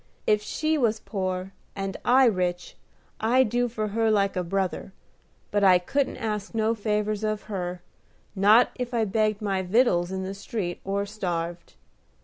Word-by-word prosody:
If 210 -1 +3
she 310 +8 -1
was 225 -4 +1
poor 185 -2 -4 0.2
and 195 -1 -4
I 260 +2 +5
rich, 180 -5 0 0.4
I'd 245 +2 +3
do 245 +2 +1
for 215 -2 -3
her 225 +2 +1
like 200 -2 +2
a 180 - 0
brother; 190 +1 -2 0.6
but 205 0 +1
I 185 -2 +7
couldn't 275 +10 -1
ask 215 -2 -4
no 220 0 +2
favors 210 -1 -1
of 215 -1 -1
her, 180 -4 -5 0.5
not 210 +5 +5
if 245 -1 -4
I 225 -1 +2
begged 215 +1 0
my 195 -2 0
vittles 185 -3 +2
in 190 0 -3
the 190 +1 -4
street, 195 -3 -4
or 200 +1 -1
starved. 175 -4 -4
210 Hz, 160 wpm, -26 LUFS, 190-225 Hz, 0.6 s, I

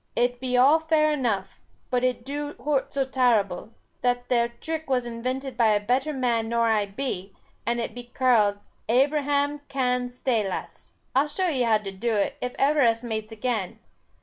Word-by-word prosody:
It 245 0 +1
be 250 -1 0
all 280 +6 +6
fair 315 -1 +2
enough, 220 -10 -1 0.3
but 250 -1 +1
it 250 -1 0
do 290 +1 -4
hoort 285 -2 -1
so 275 -1 0
tarble. 230 -8 +1 0.3
That 245 0 0
there 235 -1 +3
trick 315 +5 -6
was 250 -2 +1
invented 255 +3 -4
by 225 -3 +4
a 205 - +3
better 255 +8 0
man 240 -5 0
nor 235 0 +2
I 210 -2 +2
be, 195 -3 -5 0.3
and 235 0 +1
it 230 - -3
be 245 +1 -8
karled 240 -5 +2 0.3
'Abraham 285 +3 +2
Cann's 250 -2 -1
staylace.' 215 -7 -2 0.2
I'll 275 +3 +4
show 365 +4 -1
e 265 -4 0
how 230 -3 +4
to 205 -2 -7
do 220 +4 -1
it, 205 +7 0
if 250 0 -3
ever 290 +2 +3
us 230 -1 +3
mates 220 -2 -4
again. 220 -4 -2
245 Hz, 175 wpm, -25 LUFS, 225-270 Hz, 0.3 s, all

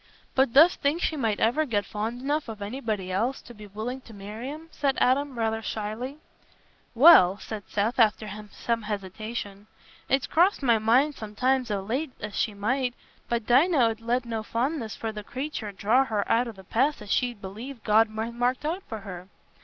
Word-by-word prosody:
"But 265 -2 +3
dost 320 +6 +6
think 290 +3 +1
she 320 - 0
might 225 -7 0
ever 245 +8 +3
get 210 -8 -1
fond 225 +4 -4
enough 290 -1 -1
of 220 -2 -7
anybody 210 -3 -3
else 235 +8 0
to 240 - -12
be 210 -2 -11
willing 220 +6 -5
to 225 -4 -14
marry 210 +6 -7
'em?" 315 +3 -9
said 275 -2 0
Adam 270 +1 +2
rather 225 -1 0
shyly. 225 +6 -4 0.8
"Well," 225 - +8
said 210 -1 -7
Seth, 215 +5 -1
after 220 -1 +3 0.2
some 230 +3 -2
hesitation, 205 0 -5 0.4
"it's 270 -1 +2
crossed 350 -1 +2
my 235 -4 +4
mind 250 +7 +3
sometimes 250 +3 -1
o' 205 -2 -1
late 260 +7 -2
as 210 -1 -6
she 215 - -1
might; 250 +5 -1 0.3
but 235 -2 -1
Dinah 295 +8 +4
'ud 225 0 -5
let 240 +2 0
no 225 -2 -3
fondness 235 +1 -2
for 225 - -4
the 210 -1 -7
creature 255 -3 -5
draw 215 +7 +3
her 210 -4 -1
out 235 +2 +2
o' - - -4
the 190 -2 -14
path 260 +6 0
as 205 - -7
she 245 -1 +1
believed 220 +6 -9
God 220 +1 +4
had 220 +2 -4
marked 245 +4 0
out 340 +5 -1
for 220 -3 -5
her. 185 -2 -8
230 Hz, 190 wpm, -26 LUFS, 210-265 Hz, 0.8 s, Well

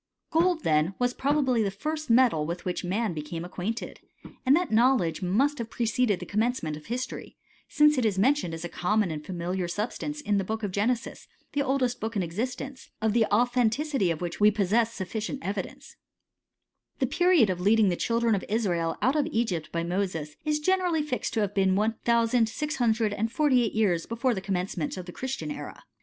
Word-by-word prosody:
Gold, 335 0 +2
then, 155 +4 +2
was 245 0 +1
probably 270 -4 +1
the 205 - +1
first 305 +10 -4
metal 230 -10 +4
with 170 +3 -5
which 180 0 -2
man 195 +2 -1
became 160 +2 -5
acquainted; 195 +6 -5 0.4
and 265 +2 +5
that 355 +2 0
knowledge 225 -7 +3
mus^ 235 +11 +2
have 230 -1 -4
preceded 230 -3 0
the - - -6
commencement 215 -7 -1
of 150 - -12
history, 250 +2 -5 0.3
since 300 -2 +4
it - - 0
is 205 -3 +1
mentioned 230 - +2
as 165 +1 -6
a - - -2
common 200 +2 0
and 150 -1 -5
familiar 180 +1 -3
substance 235 +10 -3
in 210 -8 0
the - - -1
Book 220 +3 -4
of 205 - -2
Genesis, 225 +5 -2 0.3
the 285 - +1
oldest 260 -3 0
book 225 +1 -4
in 195 - +1
existence, 255 +9 -5
of 220 -1 +1
the 230 -1 +4
authenticity 245 - +2
of 165 -1 -2
which 175 -1 -4
we 210 0 +7
possess 215 +2 +1
sufficient 215 +5 -4
evidence, 195 0 -5 1.0
The - - +1
period 350 - +4
of 180 -1 -4
leading 210 +1 +4
the 175 - 0
children 230 +3 +1
of 195 - 0
Israel 175 -7 0
out 260 +3 +3
of 300 -1 +1
\ - - -7
Egypt 185 - -1
by 170 0 -1
Moses, 170 -4 -2
is 300 0 +1
generally 355 -1 +1
fixed 295 -4 -3
to 220 - +2
have 205 -1 -1
been 190 -2 +2
one 215 +3 +2
'^ - - -16
thousand 235 0 +3
six 300 +6 -3
hundred 225 -3 +1
and 220 +2 -2
forty 285 -4 +3
eight 225 - -2
years 190 -7 +1
before 240 +2 0
the 190 - -4
commencement 185 -4 -2
of 185 - -6
the 180 - -8
Christian 265 +7 -4
era. 290 - -8
220 Hz, 200 wpm, -27 LUFS, 185-255 Hz, 1.0 s, we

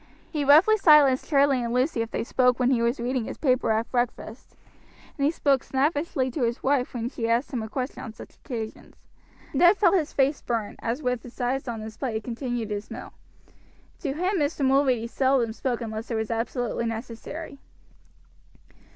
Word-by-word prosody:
He 300 -3 -1
roughly 320 +10 +6
silenced 300 -8 +5
Charlie 275 -3 +3
and 235 - -3
Lucy 250 0 +1
if 225 - -3
they - - -2
spoke 250 +1 +2
when 250 +1 +3
he 240 -3 +2
was 235 +2 0
reading 245 0 -1
his - - -6
paper 255 -5 +1
at 220 +1 -1
breakfast, 240 -1 -3 0.6
and 280 - 0
he - - +4
spoke 280 -5 +2
snappishly 280 -1 0
to 270 - -4
his 235 0 -1
wife 265 -2 +1
when 235 -1 -2
she 230 -3 -3
asked 240 +5 0
him 240 - -1
a 220 - -6
question 255 +4 -4
on 225 - -7
such - - -13
occasions. 225 -5 -7 0.6
Ned 350 +7 +5
felt 380 -4 +4
his 325 -6 +1
face 275 +1 +1
burn, 225 -4 -3
as 240 +6 -3
with 250 -2 0
his 245 +1 -13
eyes 260 +2 -1
on 230 -2 -4
his 220 0 -8
plate 250 -5 -3
he 220 - -1
continued 240 -1 -4
his 205 0 -4
meal. - - -8 0.9
To 280 -5 -2
him 365 +5 0
Mr. 290 -1 0
Mulready 265 -3 +3
seldom 255 -1 +1
spoke 245 0 -2
unless 220 0 -5
it 235 - -2
was 220 0 -2
absolutely 235 0 -2
necessary. 240 +6 -6
250 Hz, 190 wpm, -26 LUFS, 230-280 Hz, 0.9 s, roughly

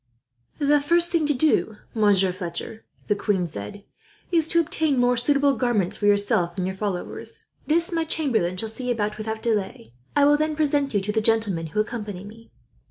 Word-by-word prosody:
"The 290 0 +3
first 340 +4 +2
thing 325 -4 +1
to 295 - +2
do, 245 -6 +2 0.2
Monsieur 200 -4 +3
Fletcher," 180 +4 -6 0.2
the 205 - +1
queen 200 -3 0
said, 140 - -8 0.5
"is 325 -3 +4
to 335 - +2
obtain 315 -3 0
more 245 0 +3
suitable 280 +3 +2
garments 215 -5 0
for 205 - -1
yourself 200 -4 +1
and 185 - -1
your 190 +1 -3
followers. 190 -3 -5 0.2
This 335 +3 +1
my 330 -1 0
chamberlain 245 - +1
shall 225 - -1
see 250 +3 -4
about, 210 -2 -2
without 220 0 -4
delay. 195 - -2 0.2
I 285 -1 +5
will 295 +1 +5
then 310 0 -1
present 285 -4 0
you 200 - +2
to 205 +2 -2
the 220 +1 0
gentlemen 215 -7 +1
who 160 +7 -3
accompany 210 -4 -4
me. 225 +3 -13
220 Hz, 185 wpm, -24 LUFS, 200-290 Hz, 0.5 s, I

